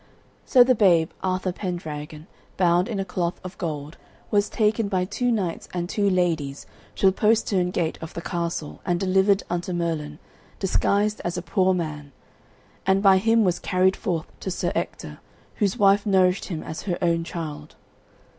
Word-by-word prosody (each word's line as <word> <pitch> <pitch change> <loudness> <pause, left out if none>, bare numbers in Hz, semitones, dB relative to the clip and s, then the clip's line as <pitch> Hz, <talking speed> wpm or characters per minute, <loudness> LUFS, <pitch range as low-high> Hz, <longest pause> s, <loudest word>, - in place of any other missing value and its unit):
So 250 -2 +7
the 255 +1 +4
babe, 175 -8 +4
Arthur 185 0 -1
Pendragon, 155 -5 -6 0.3
bound 175 0 +3
in 215 -4 -3
a 195 - -1
cloth 180 -2 -2
of 185 +1 -8
gold, 155 -3 -4 0.3
was 205 -1 +2
taken 215 0 +1
by 185 -2 0
two 245 +6 -1
knights 190 -7 -2
and 175 -1 -2
two 200 +2 +1
ladies 165 -7 0 0.3
to - - 0
the 190 - +7
postern 210 -3 +2
gate 170 -3 -2
of 160 - -8
the 170 - -4
castle 170 -3 -4
and 175 -1 0
delivered 190 +1 +3
unto 175 +1 -3
Merlin, 160 -4 -2 0.4
disguised 205 +2 +1
as 175 +1 -2
a 175 - -4
poor 185 +2 +2
man, 150 -5 -5 0.7
and 195 +1 +2
by 190 -1 +6
him 225 +2 +3
was 180 -3 +1
carried 185 0 +2
forth 170 -6 -2
to - - -4
Sir 180 - -1
Ector, - - -4 0.4
whose 200 -4 0
wife 200 0 +4
nourished 185 -1 +3
him 165 -5 -5
as 160 - -6
her 175 - 0
own 170 -1 +2
child. 165 -3 -7
180 Hz, 170 wpm, -24 LUFS, 170-195 Hz, 0.7 s, So